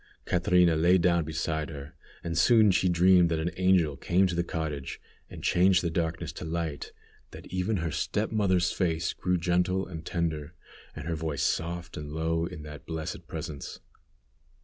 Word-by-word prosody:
Catrina 90 -1 +3
lay 85 +4 +4
down 85 -2 +2
beside 80 0 -2
her, 70 -1 -9 0.3
and 85 -1 -3
soon 110 +5 +5
she 95 0 +2
dreamed 90 0 +5
that 80 - 0
an 80 +2 -1
angel 90 -5 +3
came 95 +5 +2
to 90 - -1
the 85 0 0
cottage 80 -5 -4 0.3
and - - -10
changed 90 0 +4
the 85 - -1
darkness 80 -1 -2
to - - -8
light, 80 -3 -4 0.4
that - - -11
even 95 +3 0
her 80 -2 -2
step 105 +7 -1
mother's 95 -5 +2
face 85 -3 -1
grew 90 0 0
gentle 90 +2 +1
and 80 -3 -8
tender, 80 -2 -3 0.4
and 75 0 -7
her 85 - -1
voice 80 -3 -2
soft 85 +1 -2
and 75 0 -6
low 80 +1 0
in 85 -4 -9
that 75 -3 -10
blessed 80 -1 -5
presence. 70 -3 -6
85 Hz, 170 wpm, -28 LUFS, 80-90 Hz, 0.4 s, soon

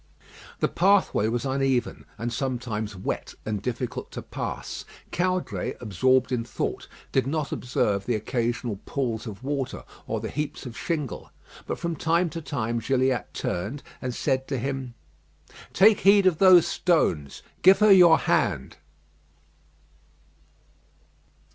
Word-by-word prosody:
The - - +3
pathway 190 - +3
was 120 +2 -1
uneven, 135 -2 0
and 115 +2 -3
sometimes 120 -6 -3
wet 95 - -4
and 105 -2 -2
difficult 125 +2 -4
to - - -6
pass. - - -5 0.3
Caudray, 185 +1 -1
absorbed 125 +4 +2
in 120 -2 0
thought, - - -4 0.2
did 135 -1 +1
not 150 0 -2
observe 100 -5 -1
the 120 - +1
occasional 120 0 -2
pools 120 -4 -2
of 105 +1 -8
water 140 -1 -3 0.2
or - - -2
the - - -5
heaps 150 -1 -4
of 120 -3 -7
shingle. 150 -8 -4 0.4
But - - -2
from 170 -1 -3
time 165 +3 +1
to 165 - -5
time 120 -5 -2
Gilliatt 130 +1 0
turned 110 +11 -3 0.2
and 130 - -2
said 130 0 0
to 135 - -2
him, 130 -1 -4 0.8
"Take 210 +1 +5
heed 200 0 +5
of 180 -4 +3
those 185 -3 +7
stones. 85 - 0 0.2
Give 190 +2 +7
her 210 -1 +5
your 175 -4 +8
hand." - - 0
130 Hz, 135 wpm, -26 LUFS, 115-160 Hz, 0.8 s, your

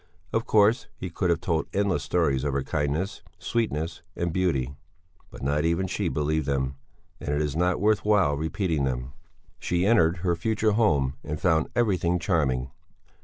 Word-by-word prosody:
Of 115 0 0
course 110 +3 +4
he 90 - -6
could 90 +1 -1
have 85 -1 +1
told 85 -3 0
endless 100 -2 +1
stories 70 -7 +1
of 70 -2 -1
her 70 0 0
kindness, 80 +7 -2 0.2
sweetness, 85 -9 -2
and 85 -1 -2
beauty; 75 -8 0 0.6
but - - -11
not 75 +2 +1
even 85 +3 +1
she 95 - -2
believed 75 0 -1
them, 65 -1 0 0.5
and - - -6
it 75 0 +1
is 75 -1 -1
not 90 +2 +1
worth 105 +2 +2
while 100 -9 +3
repeating 80 0 -1
them. 65 -1 -2 0.5
She 90 +1 0
entered 95 -6 +4
her 85 -1 +2
future 110 +4 +1
home 75 - +2
and 75 0 -4
found 80 -3 +2
everything 95 -7 +2
charming. 70 -8 0
85 Hz, 170 wpm, -26 LUFS, 75-95 Hz, 0.6 s, course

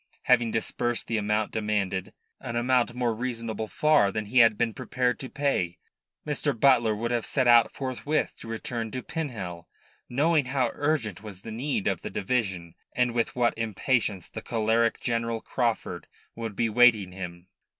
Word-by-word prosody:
Having 120 -2 +4
disbursed 120 +2 -1
the 115 - -1
amount 105 +1 0
demanded 105 -4 -1 0.3
an 120 - -6
amount 120 0 +2
more 120 -2 0
reasonable 115 -2 -3
far 150 -8 +3
than 110 +1 -3
he 125 +5 +2
had 115 -2 +6
been 115 -1 0
prepared 125 +2 -1
to 130 - -6
pay 115 -12 -1 0.5
Mr. 145 -4 -1
Butler 120 -5 +4
would 115 +3 -2
have 120 -2 0
set 130 -3 +1
out 120 -1 +6
forthwith 135 +3 -2
to - - -10
return 115 0 -4
to 130 +3 -5
Pinhel, 100 - -5 0.4
knowing 150 +3 +2
how 130 -2 0
urgent 140 - -1
was 100 -3 -10
the 115 - -7
need 120 -1 -2
of - - 0
the - - -5
division 95 -6 -2 0.2
and 125 -1 +2
with 115 -1 0
what 120 -1 +2
impatience 110 -3 0
the - - -7
choleric 115 0 +1
General 115 -1 -1
Craufurd 120 0 -2 0.3
would 115 -3 -5
be 115 - +1
awaiting 110 -4 +4
him. 90 -1 -8
115 Hz, 165 wpm, -27 LUFS, 105-125 Hz, 0.5 s, had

